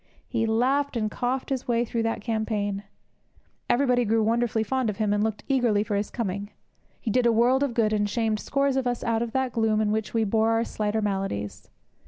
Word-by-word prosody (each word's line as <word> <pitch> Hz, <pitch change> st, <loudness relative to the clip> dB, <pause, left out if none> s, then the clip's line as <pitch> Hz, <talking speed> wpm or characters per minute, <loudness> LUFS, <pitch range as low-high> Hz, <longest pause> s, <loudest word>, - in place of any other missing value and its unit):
He 225 Hz, -3 st, 0 dB
laughed 260 Hz, +4 st, +1 dB
and 215 Hz, -2 st, -1 dB
coughed 255 Hz, +4 st, -2 dB
his 260 Hz, -2 st, -2 dB
way 235 Hz, 0 st, +2 dB
through 230 Hz, 0 st, -2 dB
that 225 Hz, -1 st, -1 dB
campaign. 215 Hz, -3 st, -1 dB, 0.9 s
Everybody 250 Hz, -1 st, +3 dB
grew 225 Hz, 0 st, +2 dB
wonderfully 230 Hz, 0 st, +1 dB
fond 255 Hz, +1 st, 0 dB
of 210 Hz, -, -4 dB
him, 210 Hz, -2 st, +1 dB
and 205 Hz, 0 st, +1 dB
looked 215 Hz, -1 st, -2 dB
eagerly 240 Hz, -7 st, +2 dB
for 210 Hz, -, -2 dB
his 205 Hz, +1 st, -1 dB
coming. 205 Hz, -3 st, -3 dB, 0.5 s
He 225 Hz, -, -2 dB
did 245 Hz, +2 st, +3 dB
a -, -, +5 dB
world 245 Hz, +4 st, +3 dB
of 275 Hz, -5 st, 0 dB
good, 215 Hz, -2 st, +2 dB
and 205 Hz, -1 st, +1 dB
shamed 220 Hz, -1 st, 0 dB
scores 275 Hz, +1 st, 0 dB
of 260 Hz, -2 st, 0 dB
us 245 Hz, -1 st, -2 dB
out 230 Hz, -1 st, 0 dB
of 235 Hz, -1 st, -2 dB
the 265 Hz, +1 st, 0 dB
gloom 220 Hz, -2 st, +2 dB
in 215 Hz, -1 st, +1 dB
which 220 Hz, 0 st, -1 dB
we 225 Hz, -1 st, +1 dB
bore 220 Hz, +2 st, +2 dB
our 225 Hz, 0 st, +2 dB
slighter 215 Hz, -1 st, -2 dB
maladies. 195 Hz, -, -3 dB
225 Hz, 215 wpm, -26 LUFS, 210-245 Hz, 0.9 s, a